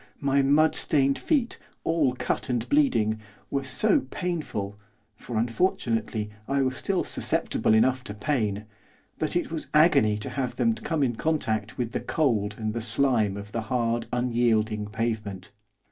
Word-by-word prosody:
my 140 Hz, -1 st, +2 dB
mud 145 Hz, +4 st, +4 dB
stained 140 Hz, -2 st, +3 dB
feet, 270 Hz, -7 st, 0 dB, 0.2 s
all 155 Hz, -6 st, +1 dB
cut -, -, -2 dB
and 120 Hz, -2 st, -1 dB
bleeding, 110 Hz, -, +2 dB, 0.3 s
were 140 Hz, 0 st, 0 dB
so 130 Hz, -1 st, +3 dB
painful 135 Hz, -, -3 dB, 0.3 s
for, 110 Hz, +2 st, -6 dB
unfortunately, 115 Hz, -, 0 dB, 0.2 s
I 140 Hz, 0 st, +1 dB
was 130 Hz, 0 st, -1 dB
still 190 Hz, +7 st, -1 dB
susceptible 110 Hz, -, +1 dB
enough 130 Hz, +3 st, +3 dB
to 105 Hz, -, -6 dB
pain 105 Hz, -5 st, -1 dB, 0.5 s
that 155 Hz, +2 st, -1 dB
it 175 Hz, -2 st, 0 dB
was 160 Hz, -2 st, -4 dB
agony 140 Hz, -10 st, +5 dB
to 105 Hz, -, -5 dB
have 130 Hz, -3 st, -2 dB
them 115 Hz, -2 st, +2 dB
come 150 Hz, +6 st, -1 dB
into 120 Hz, -4 st, -1 dB
contact 110 Hz, -9 st, -1 dB
with 120 Hz, -2 st, -2 dB
the -, -, -2 dB
cold 110 Hz, -10 st, 0 dB
and 110 Hz, -1 st, -2 dB
the 115 Hz, -, -3 dB
slime 115 Hz, -3 st, +1 dB
of 100 Hz, 0 st, -8 dB
the 115 Hz, -, -2 dB
hard, 120 Hz, 0 st, -1 dB
unyielding 115 Hz, -3 st, +1 dB
pavement. 105 Hz, -3 st, -3 dB
120 Hz, 155 wpm, -26 LUFS, 110-140 Hz, 0.5 s, agony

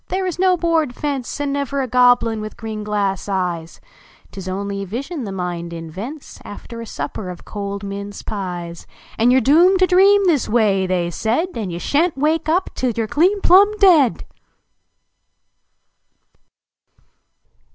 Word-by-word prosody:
There 375 Hz, +1 st, -2 dB
is 360 Hz, -1 st, -4 dB
no 370 Hz, -1 st, +3 dB
board 325 Hz, -6 st, 0 dB
fence, 280 Hz, -3 st, -4 dB
And 285 Hz, -1 st, -1 dB
never 280 Hz, 0 st, -2 dB
a -, -, -3 dB
Goblin 245 Hz, -3 st, +3 dB
with 215 Hz, 0 st, -8 dB
green 220 Hz, -2 st, -6 dB
glass 205 Hz, -2 st, -2 dB
eyes! 175 Hz, -4 st, -3 dB, 0.5 s
Tis 190 Hz, -2 st, -7 dB
only 200 Hz, +1 st, -4 dB
a -, -, -4 dB
vision 270 Hz, -, -5 dB
the 200 Hz, -, -5 dB
mind 175 Hz, -2 st, -4 dB
invents 190 Hz, -, -8 dB
After 230 Hz, +3 st, -9 dB
a 230 Hz, -, -8 dB
supper 165 Hz, +6 st, -5 dB
of 180 Hz, -, -9 dB
cold 200 Hz, -1 st, -5 dB
mince 200 Hz, 0 st, -6 dB
pies, 175 Hz, -4 st, -6 dB, 0.3 s
And 235 Hz, +2 st, +4 dB
you 255 Hz, -, +5 dB
re -, -, +3 dB
doomed 340 Hz, -, +5 dB
to 370 Hz, -, +4 dB
dream 390 Hz, +2 st, +5 dB
this 315 Hz, -9 st, +1 dB
way," 205 Hz, -5 st, +2 dB
they 175 Hz, -2 st, -1 dB
said, 235 Hz, -, -1 dB
"And 210 Hz, -6 st, -4 dB
you 170 Hz, -, -5 dB
slia 290 Hz, -, +2 dB
n 360 Hz, -, -2 dB
t -, -, -12 dB
wake 315 Hz, +3 st, +1 dB
nf> 345 Hz, +5 st, 0 dB
till 255 Hz, -, -1 dB
you 230 Hz, -1 st, -2 dB
re -, -, -4 dB
clean 370 Hz, -, +2 dB
plnin 405 Hz, +4 st, +5 dB
deed 340 Hz, -, +4 dB
230 Hz, 170 wpm, -19 LUFS, 195-315 Hz, 0.5 s, you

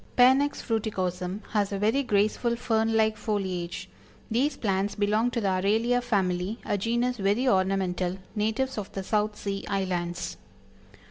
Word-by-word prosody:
Panax 265 Hz, +3 st, +4 dB
Fruiticosm 190 Hz, -4 st, -2 dB
has 205 Hz, -2 st, +1 dB
a 200 Hz, -, -1 dB
very 220 Hz, +7 st, +2 dB
graceful 225 Hz, 0 st, +1 dB
fern 225 Hz, -1 st, +1 dB
like 220 Hz, 0 st, +3 dB
foliage. 190 Hz, -5 st, -3 dB, 0.4 s
These 265 Hz, +7 st, +1 dB
plants 195 Hz, -1 st, 0 dB
belong 210 Hz, +3 st, +2 dB
to 245 Hz, -, -2 dB
the 200 Hz, -, +1 dB
Aralia 220 Hz, +6 st, +2 dB
family, 190 Hz, -2 st, 0 dB
a -, -, 0 dB
genus 235 Hz, +4 st, 0 dB
very 205 Hz, +6 st, +1 dB
ornamental, 185 Hz, -3 st, +1 dB, 0.2 s
natives 220 Hz, +4 st, 0 dB
of 200 Hz, -, -6 dB
the 195 Hz, -, -4 dB
South 210 Hz, +1 st, 0 dB
Sea 195 Hz, -1 st, -4 dB
Islands. 180 Hz, -3 st, -2 dB
210 Hz, 140 wpm, -27 LUFS, 190-230 Hz, 0.4 s, Panax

